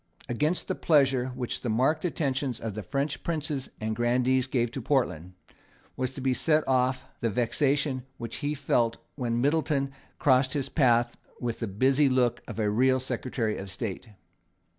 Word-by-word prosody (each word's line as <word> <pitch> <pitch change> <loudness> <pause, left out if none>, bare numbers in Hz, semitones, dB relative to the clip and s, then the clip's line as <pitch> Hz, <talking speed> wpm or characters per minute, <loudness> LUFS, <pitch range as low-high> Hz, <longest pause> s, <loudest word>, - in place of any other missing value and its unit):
Against 150 +9 +1
the - - 0
pleasure 135 -5 +3
which 125 -2 -3
the 120 - -2
marked 130 +8 +2
attentions 135 -7 -1
of 110 -2 -4
the 110 - -4
French 140 +6 -2
princes 155 -5 -2
and 110 0 -2
grandees 125 +2 +2
gave 120 -3 0
to 135 - -5
Portland, 95 - 0 0.6
was 130 0 -2
to 135 - -7
be 130 0 +2
set 155 +3 +2
off 130 0 +1
the 115 - 0
vexation 135 +4 +1 0.2
which 115 -1 -6
he 145 +1 -2
felt 120 -5 +1 0.2
when 120 -3 -1
Middleton 145 -1 +1 0.3
crossed 130 -1 +3
his 140 -3 -2
path 120 -4 +2 0.2
with 120 -2 -3
the 115 - -2
busy 130 +8 +3
look 125 -2 +2
of - - -7
a 110 -2 +1
real 130 +5 +3
Secretary 125 -3 -2
of 95 - -7
State. 100 +3 -5
130 Hz, 165 wpm, -28 LUFS, 120-140 Hz, 0.6 s, pleasure